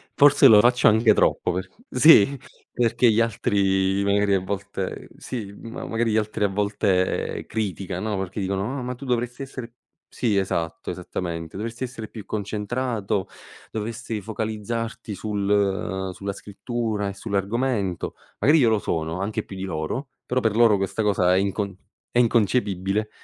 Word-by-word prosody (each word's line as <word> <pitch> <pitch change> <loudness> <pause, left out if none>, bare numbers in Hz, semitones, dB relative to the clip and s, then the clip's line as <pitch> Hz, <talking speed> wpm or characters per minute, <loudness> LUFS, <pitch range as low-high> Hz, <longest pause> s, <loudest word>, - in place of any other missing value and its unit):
forse 145 -1 +7
lo 110 -4 +8
faccio 125 +2 +4
anche 110 0 +5
troppo 90 - +2
per 95 +1 -4 0.2
sì 140 -4 +6 0.3
perché 120 0 +3
gli 110 - +2
altri 100 -3 +1
magari 100 0 +2
a 95 - +3
volte 100 0 -5
sì, 105 -6 -6
ma 115 +4 -7
magari 115 0 0
gli 110 - +2
altri 105 -1 0
a - - +4
volte 100 -2 0
criticano, 100 -1 -3
no, 100 - -1
perché 95 +2 -4
dicono: 100 +7 -2
"Ah - - -4
ma 125 0 -4
tu 135 - -10
dovresti 125 +1 -1
essere" 125 -3 -8 0.4
sì 110 -5 0
esatto, 85 -4 -2
esattamente, 85 -2 -5
"dovresti 115 +4 -4
essere 115 -3 -6
più 105 -3 -10
concentrato, 105 -1 -2 0.4
dovresti 110 0 -4
focalizzarti 110 +1 -4
sul 100 -2 0
sulla 100 +2 -4
scrittura 105 0 -3
e - - -5
sull'argomento". 100 0 -1 0.2
Magari 150 +3 +5
io 120 - +5
lo 110 -1 +2
sono 80 -1 -2
anche 110 +2 -2
più 95 - -10
di 95 - -5
loro, 85 - -3 0.2
però 125 +1 0
per 110 -3 0
loro 115 -3 +5
questa 95 +3 -1
cosa 90 -3 +3
è - - +4
incon 100 0 -1 0.4
è - - 0
inconcepibile 105 -3 +1
105 Hz, 155 wpm, -24 LUFS, 95-115 Hz, 0.4 s, lo